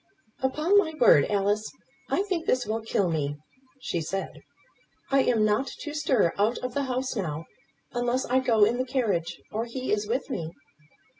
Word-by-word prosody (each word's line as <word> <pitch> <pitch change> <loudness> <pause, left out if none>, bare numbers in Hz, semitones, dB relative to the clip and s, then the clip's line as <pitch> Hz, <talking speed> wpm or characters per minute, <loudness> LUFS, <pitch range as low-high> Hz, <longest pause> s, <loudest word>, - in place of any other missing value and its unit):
"Upon 305 +9 +3
my 320 -5 -1
word, 205 - +7
Alice, 205 +1 0 0.4
I 390 - +1
think 365 -5 -3
this 255 -1 +2
will 220 +2 -2
kill 205 -3 0
me," 145 -3 -1 0.5
she 170 -8 -2
said. 195 +5 -3 0.8
"I 275 - +5
am 225 -4 +3
not 215 +6 +1
to 295 - -5
stir 260 - +2
out 215 +4 +2
of 250 -1 -3
the 280 +1 0
house 255 0 -2
now, 165 -6 -3 0.5
unless 245 +1 0
I 255 +2 +2
go 235 -5 +3
in 235 +4 0
the - - +2
carriage, 220 -11 -1
or 225 +2 -2
he 255 +2 -4
is 210 0 -1
with 245 +5 -1
me." 165 -9 -3
240 Hz, 175 wpm, -27 LUFS, 205-260 Hz, 0.8 s, word